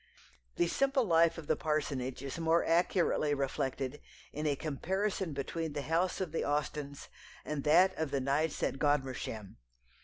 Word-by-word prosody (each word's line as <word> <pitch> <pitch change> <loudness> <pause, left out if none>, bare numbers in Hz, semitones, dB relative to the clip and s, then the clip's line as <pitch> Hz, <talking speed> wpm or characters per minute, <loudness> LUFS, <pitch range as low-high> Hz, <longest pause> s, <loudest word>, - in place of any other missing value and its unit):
The - - +3
simple 270 - +2
life 170 -4 +4
of 165 - -7
the - - +2
parsonage 140 -5 -2
is 140 +4 -5
more 165 +1 +3
accurately 165 -3 +2
reflected 135 0 -2 0.3
in 150 +1 -2
a 145 - +2
comparison 185 +6 -2
between 150 +3 -3
the 145 -1 -3
house 165 +6 0
of 185 -5 -2
the 165 - -1
Austens 145 -1 -2 0.4
and 150 -2 -3
that 180 +5 +5
of 160 -2 0
the 140 - 0
Knights 140 +4 0
at 135 - -1
Godmersham. 130 -8 -1
150 Hz, 155 wpm, -32 LUFS, 140-165 Hz, 0.4 s, that